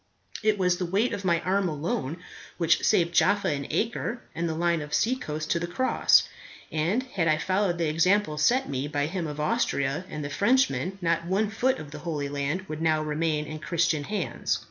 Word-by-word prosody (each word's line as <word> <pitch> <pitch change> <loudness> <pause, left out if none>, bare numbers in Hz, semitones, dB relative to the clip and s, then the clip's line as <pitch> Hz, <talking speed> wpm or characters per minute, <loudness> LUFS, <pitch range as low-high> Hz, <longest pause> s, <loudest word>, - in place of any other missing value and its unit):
It 215 -1 +2
was 180 -2 +2
the 180 - -2
weight 205 +7 +1
of 200 - -4
my 170 -2 +2
arm 190 0 +1
alone 150 -1 -3 0.4
which 165 -2 +2
saved 170 -1 +3
Jaffa 205 +3 +3
and 140 -2 -2
Acre, 235 +1 -1
and 170 0 -2
the 160 - -2
line 170 0 +1
of 150 0 -3
seacoast, 155 -11 -1
to 170 - +2
the 175 - -3
Cross. 260 +9 +3 0.4
And 170 +11 0
had 195 -10 -2
I 155 -1 +3
followed 185 +1 0
the 165 -1 0
example 165 +1 +2
set 245 +12 +3
me 135 +1 -2
by 145 -1 -1
him 170 +1 -3
of 150 0 -6
Austria 150 - 0
and 150 -1 -5
the 145 - -5
Frenchman, 215 - +2
not 170 0 +1
one 200 +3 +1
foot 250 +4 +1
of 155 -3 -9
the 150 - -7
Holy 150 -3 -3
Land 145 +5 -2
would 155 -4 -6
now 160 -1 +2
remain 155 0 -1
in 155 +1 -7
Christian 160 -2 0
hands." 210 +5 -2
170 Hz, 200 wpm, -27 LUFS, 150-195 Hz, 0.4 s, saved